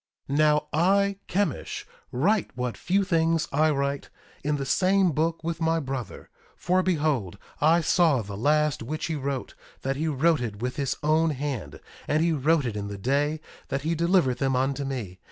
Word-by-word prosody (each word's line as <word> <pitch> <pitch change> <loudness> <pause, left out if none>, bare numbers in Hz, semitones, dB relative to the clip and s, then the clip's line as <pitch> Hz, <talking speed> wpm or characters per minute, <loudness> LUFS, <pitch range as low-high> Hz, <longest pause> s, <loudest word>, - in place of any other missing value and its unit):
1:9 140 - -2
Now 150 -1 +3
I, 195 +5 +3
Chemish, 185 -5 -2 0.3
write 190 - +1
what 125 -1 -2
few 195 +2 +1
things 165 -3 +1
I 155 +3 +3
write, 140 -1 -1 0.3
in 150 +1 0
the 140 -1 -3
same 185 +4 +3
book 160 +3 -1
with 165 0 -3
my 165 0 +2
brother; 135 - -6 0.3
for 185 +1 +2
behold, 150 - 0 0.2
I 165 +3 +4
saw 160 -7 +3
the 100 0 -7
last 150 +5 +1
which 155 +7 -4
he 160 - -2
wrote, 140 -2 -3 0.3
that 135 +1 -1
he 160 +2 -1
wrote 155 0 +2
it 110 -4 -4
with 125 +2 -3
his 140 -2 -1
own 160 +2 +3
hand; 140 - -4 0.3
and 155 +2 +2
he 170 - +2
wrote 155 0 +2
it 115 -4 -3
in 100 -1 -4
the 100 0 -6
day 145 +8 0 0.3
that 135 0 -3
he 160 +2 0
delivered 170 -6 +2
them 135 -1 +1
unto 135 +2 0
me. 115 -9 -5
150 Hz, 185 wpm, -26 LUFS, 135-165 Hz, 0.3 s, I